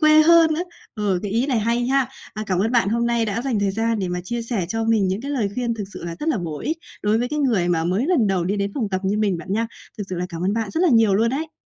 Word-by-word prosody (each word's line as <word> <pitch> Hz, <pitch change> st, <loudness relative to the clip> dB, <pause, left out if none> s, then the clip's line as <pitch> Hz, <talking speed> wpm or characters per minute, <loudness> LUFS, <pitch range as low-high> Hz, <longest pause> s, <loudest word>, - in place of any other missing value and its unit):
quê 310 Hz, 0 st, +7 dB
hơn 325 Hz, 0 st, +6 dB
nữa. 335 Hz, -, -1 dB, 0.3 s
Ờ, 205 Hz, -5 st, 0 dB
cái 205 Hz, -, -3 dB
ý 235 Hz, +4 st, +1 dB
này 260 Hz, -5 st, +1 dB
hay 235 Hz, +3 st, 0 dB
ha! 270 Hz, -1 st, +2 dB, 0.3 s
À, 215 Hz, -, -4 dB
cảm 185 Hz, -3 st, 0 dB
ơn 220 Hz, +5 st, +1 dB
bạn 235 Hz, -5 st, +3 dB
hôm 235 Hz, +2 st, +1 dB
nay 235 Hz, -1 st, +1 dB
đã 220 Hz, +2 st, -2 dB
dành 255 Hz, -5 st, 0 dB
thời 200 Hz, -, +1 dB
gian 225 Hz, +2 st, 0 dB
để 185 Hz, -, -2 dB
mà 180 Hz, 0 st, -2 dB
chia 235 Hz, +3 st, -3 dB
sẻ 225 Hz, -6 st, -2 dB
cho 225 Hz, +2 st, -1 dB
mình 220 Hz, -4 st, +2 dB
những 190 Hz, +3 st, -1 dB
cái 280 Hz, +3 st, -5 dB
lời 235 Hz, -8 st, 0 dB
khuyên 240 Hz, -1 st, -1 dB
thực 210 Hz, -, -4 dB
sự -, -, -8 dB
là 170 Hz, -1 st, -4 dB
rất 310 Hz, -, -1 dB
là 295 Hz, -9 st, +1 dB
bổ 160 Hz, -4 st, -4 dB
ích 320 Hz, -, -2 dB, 0.2 s
đối 210 Hz, +2 st, +2 dB
với 245 Hz, +1 st, -1 dB
cái 300 Hz, +2 st, -2 dB
người 225 Hz, -11 st, +2 dB
mà 165 Hz, -2 st, +1 dB
mới 190 Hz, +10 st, 0 dB
lần 320 Hz, -11 st, +3 dB
đầu 190 Hz, -3 st, +1 dB
đi 195 Hz, +4 st, -1 dB
đến 200 Hz, 0 st, -1 dB
phòng 230 Hz, -7 st, -1 dB
tập 190 Hz, -1 st, -2 dB
như 200 Hz, +2 st, +1 dB
mình 200 Hz, -5 st, +1 dB
bạn 185 Hz, +3 st, -6 dB
nha! 225 Hz, +3 st, +1 dB, 0.3 s
Thực 205 Hz, -, -3 dB
sự 185 Hz, -, -3 dB
là 180 Hz, +1 st, -2 dB
cảm 170 Hz, -1 st, -6 dB
ơn 195 Hz, -, +1 dB
bạn 220 Hz, -2 st, -2 dB
rất 320 Hz, -, -1 dB
là 365 Hz, -, +4 dB
nhiều 225 Hz, -7 st, +4 dB
luôn 225 Hz, +4 st, +3 dB
đấy! 315 Hz, +4 st, -3 dB
225 Hz, 325 wpm, -22 LUFS, 195-250 Hz, 0.3 s, quê